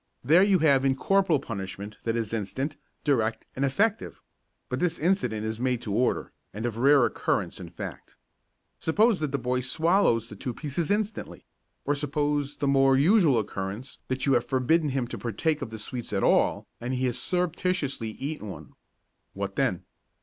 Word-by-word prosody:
There 160 Hz, +8 st, +6 dB
you 195 Hz, -1 st, +5 dB
have 145 Hz, -5 st, +4 dB
incorporal 160 Hz, +6 st, +3 dB
punishment 100 Hz, +1 st, -6 dB
that 115 Hz, 0 st, 0 dB
is 115 Hz, -2 st, -2 dB
instant, 130 Hz, +8 st, -2 dB, 0.3 s
direct 115 Hz, -6 st, +1 dB
and 135 Hz, -, -1 dB
effective; 200 Hz, +11 st, 0 dB, 0.5 s
but -, -, -3 dB
this 175 Hz, -1 st, 0 dB
incident 125 Hz, -, 0 dB
is 110 Hz, 0 st, -3 dB
made 125 Hz, -1 st, 0 dB
to 105 Hz, -, -3 dB
order 125 Hz, +4 st, 0 dB, 0.2 s
and 110 Hz, +3 st, -3 dB
of 120 Hz, -3 st, -2 dB
rare 135 Hz, +1 st, +5 dB
occurrence -, -, -1 dB
in -, -, -8 dB
fact. -, -, -8 dB, 0.6 s
Suppose 210 Hz, +6 st, +3 dB
that 150 Hz, -3 st, -2 dB
the 140 Hz, -, 0 dB
boy 125 Hz, 0 st, -1 dB
swallows 145 Hz, -, +2 dB
the 105 Hz, -, -10 dB
two 120 Hz, +4 st, -5 dB
pieces 150 Hz, +2 st, -3 dB
instantly, 210 Hz, +1 st, -2 dB, 0.4 s
or 145 Hz, -, +2 dB
suppose 145 Hz, 0 st, -1 dB
the 140 Hz, -, -1 dB
more 135 Hz, -1 st, +4 dB
usual 160 Hz, -, +5 dB
occurrence 105 Hz, +4 st, -4 dB
that 130 Hz, 0 st, -1 dB
you 135 Hz, -, +3 dB
have 120 Hz, -1 st, +2 dB
forbidden 145 Hz, +4 st, +2 dB
him 130 Hz, -2 st, -1 dB
to -, -, -7 dB
partake 150 Hz, -, -1 dB
of 135 Hz, -, -4 dB
the 110 Hz, -, -7 dB
sweets 120 Hz, +2 st, -5 dB
at 100 Hz, -2 st, 0 dB
all -, -, +3 dB
and 125 Hz, +2 st, -3 dB
he 130 Hz, +1 st, 0 dB
has 125 Hz, 0 st, -1 dB
surreptitiously 175 Hz, -7 st, -1 dB
eaten 140 Hz, +1 st, -5 dB
one. 80 Hz, -6 st, -10 dB, 0.6 s
What -, -, -4 dB
then? -, -, 0 dB
135 Hz, 175 wpm, -27 LUFS, 115-155 Hz, 0.6 s, There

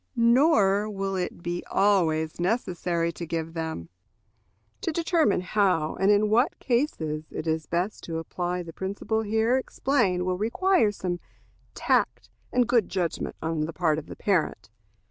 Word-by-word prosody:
Nor 230 Hz, -5 st, +4 dB
will 195 Hz, -1 st, -3 dB
it 180 Hz, -2 st, -4 dB
be 175 Hz, 0 st, -3 dB
always 165 Hz, -6 st, +2 dB
necessary 175 Hz, -4 st, 0 dB
to 170 Hz, -, -8 dB
give 165 Hz, -1 st, -3 dB
them. 160 Hz, -, -4 dB, 0.9 s
To -, -, -1 dB
determine 325 Hz, -, +2 dB
how 185 Hz, -5 st, +1 dB
and 195 Hz, -, +3 dB
in 210 Hz, +1 st, +4 dB
what 245 Hz, +10 st, +3 dB
cases 160 Hz, -, -1 dB
it -, -, -5 dB
is 160 Hz, -2 st, -1 dB
best 180 Hz, +5 st, -2 dB
to 165 Hz, -1 st, -4 dB
apply 175 Hz, +2 st, -3 dB
the 165 Hz, -1 st, -10 dB
principle 200 Hz, +4 st, -2 dB
here 220 Hz, +3 st, +2 dB
explained 195 Hz, -10 st, 0 dB
will 185 Hz, 0 st, -1 dB
require 235 Hz, -, +2 dB
some 180 Hz, -3 st, -3 dB, 0.6 s
tact -, -, 0 dB, 0.2 s
and 245 Hz, -2 st, +2 dB
good 235 Hz, -4 st, +2 dB
judgment 175 Hz, -4 st, -2 dB
on 160 Hz, -1 st, -1 dB
the 165 Hz, -, -6 dB
part 160 Hz, -3 st, +1 dB
of 155 Hz, -, -11 dB
the -, -, -8 dB
parent. 180 Hz, -, -1 dB
185 Hz, 150 wpm, -26 LUFS, 165-220 Hz, 0.9 s, Nor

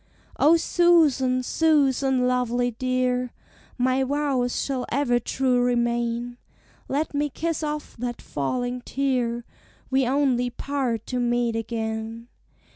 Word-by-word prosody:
"O 320 Hz, +3 st, +6 dB
Susan, 300 Hz, -8 st, +3 dB
Susan, 270 Hz, -4 st, +2 dB
lovely 245 Hz, -1 st, +1 dB
dear, 250 Hz, 0 st, -1 dB, 0.5 s
My 255 Hz, +1 st, +2 dB
vows 270 Hz, -3 st, 0 dB
shall 260 Hz, -3 st, -2 dB
ever 250 Hz, -3 st, +2 dB
true 250 Hz, +1 st, +1 dB
remain; 240 Hz, 0 st, -1 dB, 0.5 s
Let 300 Hz, +3 st, -1 dB
me 290 Hz, +1 st, 0 dB
kiss 325 Hz, +4 st, -2 dB
off 300 Hz, -1 st, -4 dB
that 240 Hz, 0 st, -4 dB
falling 245 Hz, -, -3 dB
tear; 245 Hz, -4 st, -1 dB, 0.5 s
We 265 Hz, -1 st, +2 dB
only 255 Hz, -2 st, +2 dB
part 250 Hz, -3 st, -2 dB
to 250 Hz, -, -3 dB
meet 240 Hz, -1 st, +1 dB
again. 225 Hz, 0 st, -4 dB
250 Hz, 115 wpm, -24 LUFS, 240-275 Hz, 0.5 s, O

